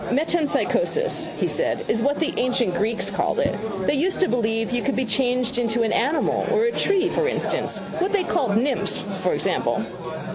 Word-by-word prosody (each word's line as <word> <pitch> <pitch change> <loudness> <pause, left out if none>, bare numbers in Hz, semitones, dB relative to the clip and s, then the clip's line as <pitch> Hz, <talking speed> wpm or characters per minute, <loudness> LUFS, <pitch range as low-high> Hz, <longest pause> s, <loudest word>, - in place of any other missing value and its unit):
—Metempsychosis, 330 - +1
he - - 0
said, - - -1
is 225 - +1
what 280 +4 +1
the 325 +1 0
ancient 250 -6 +1
Greeks 210 +1 0
called 195 - -1
it. - - +1 0.3
They - - +2
used 340 +7 +1
to 375 - +4
believe 225 -1 0
you 245 -1 0
could 275 - -1
be 260 - 0
changed 245 +1 0
into 235 0 +1
an 220 0 0
animal 285 +8 +1
or 450 -2 +3
a 470 - +2
tree, 390 -4 +2
for 455 - 0
instance. - - -1 0.2
What 375 +4 0
they 405 -2 +2
called 230 - +1
nymphs, 235 -7 0 0.2
for 185 - +1
example. - - 0
255 Hz, 185 wpm, -23 LUFS, 225-345 Hz, 0.3 s, to